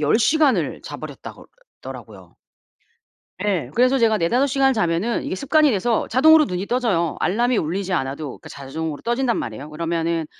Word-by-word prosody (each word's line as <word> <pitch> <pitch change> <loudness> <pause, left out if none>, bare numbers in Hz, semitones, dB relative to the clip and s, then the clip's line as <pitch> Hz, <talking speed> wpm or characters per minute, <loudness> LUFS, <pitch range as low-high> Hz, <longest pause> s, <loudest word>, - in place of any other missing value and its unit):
10 150 +8 +2
시간을 285 +4 +2
자 - - -7
버렸다고 - - -10 0.4
더라고요. - - -11 1.1
예. 180 -11 -1
그래서 255 +3 +4
제가 225 -3 +3
4-5 240 +11 +2
시간을 270 0 +2
자면은 180 +3 0
이게 - - -4
습관이 300 - +3
돼서 225 +1 0
자동으로 310 +6 +6
눈이 180 +2 -4
떠져요. 205 - 0
알람이 240 +6 +1
울리지 185 +3 -2
않아도 140 -2 -2
그러니까 - - -13
자동으로 145 +3 -6
떠진단 240 +1 0
말이에요. 135 +7 -6
그러면은 165 0 -2
200 Hz, 395 characters per minute, -21 LUFS, 165-250 Hz, 1.1 s, 자동으로